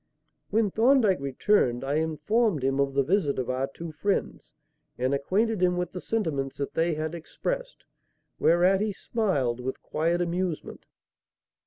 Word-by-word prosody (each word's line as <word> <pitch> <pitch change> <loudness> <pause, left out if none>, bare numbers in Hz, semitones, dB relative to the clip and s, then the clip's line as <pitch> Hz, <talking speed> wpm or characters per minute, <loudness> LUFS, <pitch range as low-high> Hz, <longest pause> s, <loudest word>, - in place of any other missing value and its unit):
When 215 -1 +2
Thorndyke 225 - +4
returned, 135 - +1
I 140 +2 0
informed 160 - +1
him 135 +1 +1
of 140 -1 +1
the 140 - +3
visit 155 -2 +1
of 130 -1 -1
our 130 +1 -1
two 165 +4 -8
friends, 200 +6 -2 0.4
and 130 +2 0
acquainted 195 +9 0
him 180 -1 +3
with 180 -1 -2
the 180 - -6
sentiments 155 -12 -2
that 140 - -4
they 165 0 +1
had 155 +1 -3
expressed; - - -5 0.6
whereat 180 +3 +4
he 210 -1 0
smiled 145 - -1
with 130 +1 -4
quiet 170 +2 0
amusement. 175 -1 -3
170 Hz, 150 wpm, -27 LUFS, 140-200 Hz, 0.6 s, Thorndyke